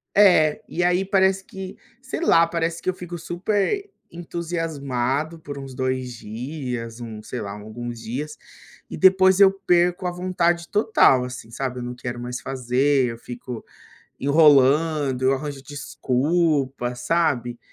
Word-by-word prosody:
É, 175 -7 +5
e 175 - -2
aí 180 +2 +2
parece 190 -1 +2
que 190 0 -8 0.2
sei 260 - -5
lá, 170 - +5
parece 165 0 -2
que - - -1
eu - - +1
fico 175 -1 -7
super 205 - -1 0.2
entusiasmado 160 -4 -3
por 145 -2 -8
uns 135 -1 -8
2 130 -1 -2
dias, 120 0 -6
hum, 110 -2 -8
sei 125 - -6
lá, 100 -2 -5
alguns 110 +4 -7
dias 145 +7 -5 0.5
e - - -6
depois 190 +2 +5
eu 195 -1 +8 0.2
perco 175 +1 +2
a 180 - 0
vontade 175 -1 0
total, 205 - +4
assim, 125 -2 -7
sabe, 125 +1 -4
eu - - -5
não 125 0 -5
quero 120 -1 -5
mais 125 +1 -5
fazer, 130 +2 +1
eu 115 -1 -5
fico 120 -1 -8 0.5
enrolando, 145 -1 +4
eu 135 - +4
arranjo 140 0 -4
desculpa, 140 -1 -1
sabe? 125 -3 0
145 Hz, 145 wpm, -23 LUFS, 125-175 Hz, 0.5 s, eu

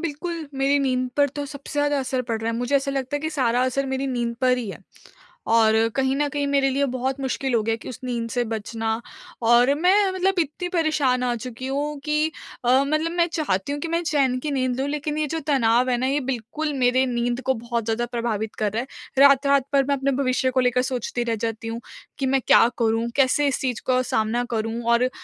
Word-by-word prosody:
बिल्कुल 335 0 -4
मेरी 275 +1 +2
नींद 255 -2 0
पर 285 -1 +4
तो 285 +2 -5
सबसे 280 0 -9
ज़्यादा 290 -1 +2
असर 260 -1 -2
पड़ 230 -2 -3
रहा 225 +1 -1
है। 230 - -3
मुझे 245 +3 +1
ऐसा 275 0 -1
लगता 270 0 -2
है - - -4
कि 315 +1 -3
सारा 250 -4 +1
असर 270 +2 -1
मेरी 265 +1 -2
नींद 240 -2 -2
पर 255 -1 +3
ही 230 -4 -4
है। - - -9 0.8
और 220 -1 +5 0.2
कहीं 265 0 +1
न 295 +1 +1
कहीं 285 0 -2
मेरे 280 -1 +2
लिए 280 +1 +1
बहुत 260 +2 -2
मुश्किल 265 0 -2
हो 230 - +3
गया 225 +1 0
है - - -2
कि - - -9
उस 250 - -8
नींद 235 -2 -3
से 245 0 0
बचना 225 +1 -4 0.6
और 245 +4 +5
मैं 380 +5 +3
मतलब 375 0 0
इतनी 340 +3 -2
परेशान 305 -7 +1
आ 245 - +1
चुकी 250 +2 -6
हूँ 290 +2 -2
कि 305 +1 +1 0.3
अ, 255 +3 +5
मतलब 310 +2 0
मैं 345 -1 +2
चाहती 280 - -1
हूँ 290 - -3
कि 335 - -3
मैं 335 +1 0
चैन 275 -5 +1
की 295 +3 -3
नींद 255 -2 -1
लूँ 275 - 0
लेकिन 300 +1 -3
ये 305 - 0
जो 325 +3 -3
तनाव 250 -3 +3
है 250 - +2
ना, 255 +2 0
ये 280 +2 +1
बिल्कुल 270 +4 -3
मेरे 255 +1 +3
नींद 240 0 -1
को 265 - +1
बहुत 235 -1 -3
ज़्यादा 230 +1 0
प्रभावित 230 -3 -3
कर 210 -1 -1
रहा 230 - 0
है। 260 - -8 0.4
रात-रात 280 -1 +3
भर 275 - +5
मैं 280 +1 0
अपने 275 0 0
भविष्य 260 0 +1
को 260 - +1
लेकर 250 0 +2
सोचती 245 -1 -2
रह 230 -1 -1
जाती 225 0 -4
हूँ 230 +1 -4 0.4
कि 275 - 0
मैं 265 0 +2
क्या 230 - +7
करूँ, 225 0 +1
कैसे 280 +1 +3
इस 275 - 0
चीज़ 250 -3 -2
का 255 0 +3
सामना 235 0 0
करूँ 225 +2 -2
और 235 +1 +4
अ, 255 - +2
260 Hz, 235 wpm, -23 LUFS, 240-285 Hz, 0.8 s, क्या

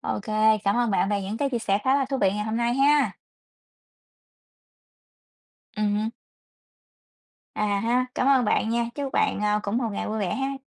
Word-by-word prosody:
OK, 205 - -3 0.4
cảm 200 +2 +2
ơn 240 -2 +1
bạn 195 0 +1
về 200 -1 -1
những 200 +3 -4
cái 280 +1 -1
chia 240 - -1
sẻ 200 -3 0
khá 260 +1 +3
là 275 -1 +2
thú 270 - -2
vị 195 -1 +3
ngày 210 +1 -3
hôm 220 +1 -2
nay 235 +1 0
ha! 285 +2 +3 2.6
Ừm 210 -1 0
hứm. 220 +2 -1 1.5
À 205 -1 0
há! 250 +2 +1
Cảm - - 0
ơn 265 -3 +4
bạn 220 - +1
nha, 235 0 0
chúc 280 -2 -4
bạn, - - +1
ơ, 210 0 +1
cũng 200 +3 -2
một 240 -3 -1
ngày - - -4
vui 220 +1 -3
vẻ 195 -4 -1
ha! 270 +1 -2
225 Hz, 190 wpm, -25 LUFS, 210-260 Hz, 2.6 s, ơn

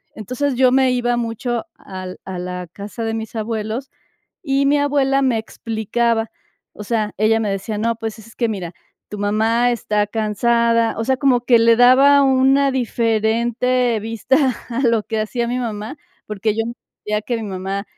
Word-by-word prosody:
entonces 255 +6 -2
yo 255 0 +4
me 260 -1 +4
iba 245 -1 0
mucho 235 0 -3
al 185 -1 -8
a 185 -2 -5
la 180 0 -5
casa 210 +3 -6
de 225 - -2
mis 225 0 -5
abuelos, 220 +3 -3 0.5
y 275 -2 +1
mi 290 +1 +3
abuela 275 -1 +2
me 255 -4 +2
explicaba. 225 +1 -1 0.4
O 210 - -9
sea, 215 -1 -1
ella 220 +1 +3
me 215 -2 -1
decía: 195 +2 -3
"No, 230 +2 0
pues 225 -1 -6
es 225 +1 -15
que 235 -2 0
mira, 180 -5 -5 0.4
tu 210 - -6
mamá 220 +4 +2
está 210 -3 0
cansada", 230 +2 +1
o 225 - -1
sea, 265 +1 +1
como 260 -3 +2
que 235 -2 +5
le 230 0 +5
daba 265 +4 +6
una 270 +1 +3
diferente 235 0 0
vista 230 +4 0 0.3
a 240 +3 -2
lo 230 -2 +2
que 220 0 -3
hacía 235 +2 -2
mi 250 +1 -1
mamá, 220 +3 -5 0.3
porque 210 0 -1
yo 225 - 0
entendía 210 -2 -5
que 240 +3 -3
mi 225 - -5
mamá 195 0 -4
230 Hz, 175 wpm, -19 LUFS, 215-250 Hz, 0.5 s, daba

